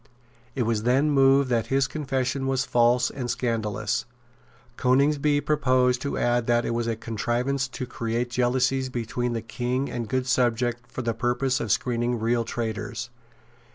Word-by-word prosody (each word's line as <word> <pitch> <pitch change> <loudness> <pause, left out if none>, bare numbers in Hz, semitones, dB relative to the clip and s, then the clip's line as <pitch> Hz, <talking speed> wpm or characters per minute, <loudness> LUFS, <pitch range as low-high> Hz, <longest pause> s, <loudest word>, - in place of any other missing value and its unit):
It 125 - +1
was 110 -2 0
then 130 +6 +2
moved 135 -1 +4
that 115 -2 +1
his 135 0 +2
confession 135 -2 -2
was 135 0 0
false 120 0 +3
and 125 -3 -5
scandalous. 115 -2 -1 0.7
Coningsby 145 +3 +2
proposed 130 -4 +2
to 140 - -3
add 120 -1 +1
that 120 0 +2
it - - -1
was 115 0 -1
a 115 - 0
contrivance 120 +5 -1
to 125 0 -6
create 120 0 -3
jealousies 130 +1 +1
between 120 0 -2
the 115 -2 -3
King 125 +3 -2
and 120 -3 -4
good 130 0 0
subjects 120 -1 0
for 130 - -4
the 115 -1 0
purpose 125 +3 0
of 110 - -2
screening 120 +1 0
real 115 +1 +1
traitors. 115 +1 -4
125 Hz, 155 wpm, -25 LUFS, 120-130 Hz, 0.7 s, moved